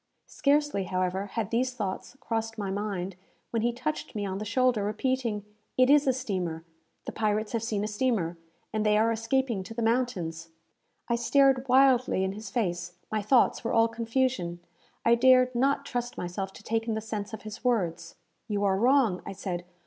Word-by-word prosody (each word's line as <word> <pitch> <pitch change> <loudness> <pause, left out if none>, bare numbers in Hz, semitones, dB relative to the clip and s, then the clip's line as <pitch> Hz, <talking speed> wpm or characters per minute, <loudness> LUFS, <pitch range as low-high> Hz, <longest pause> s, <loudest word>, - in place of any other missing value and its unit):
Scarcely, 290 -8 +1
however, 185 +2 -1
had 215 0 -3
these 250 +2 0
thoughts 210 +3 -4
crossed 225 0 -3
my 200 -2 -3
mind, 195 -2 -3 0.4
when 230 - 0
he 240 +2 +2
touched 255 +4 -4
me 205 -1 -2
on 190 0 -3
the 215 - -4
shoulder, 240 -1 +2
repeating, 220 0 -1 0.3
"It 255 +1 +5
is 290 -1 +5
a - - +6
steamer! 185 -10 -3 0.4
The - - -4
pirates 215 -1 0
have 230 - -1
seen 215 -3 -1
a - - -1
steamer, 210 -6 0 0.4
and 215 -1 0
they 210 0 +3
are 225 +2 +3
escaping 230 -1 0
to 225 +4 -9
the 235 - -1
mountains." 185 -9 -1 0.6
I 235 - +1
stared 270 +2 +3
wildly 255 -5 +4
in 190 - 0
his 210 +1 -8
face. 180 -5 -2 0.2
My 215 -1 0
thoughts 235 +4 +3
were 230 - -1
all 225 0 +5
confusion. 230 -6 -1 0.5
I 235 - +6
dared 255 +1 +5
not 275 +3 +1
trust 245 -2 -3
myself 190 +2 -4
to - - -13
take 225 +1 -1
in 225 - 0
the - - -1
sense 215 -1 -5
of 220 - -8
his 215 -1 -8
words. 170 -9 -1 0.3
"You 205 -2 -1
are 195 -1 +2
wrong," 240 -6 +3
I - - -6
said. 180 -2 -4
220 Hz, 185 wpm, -28 LUFS, 195-250 Hz, 0.6 s, a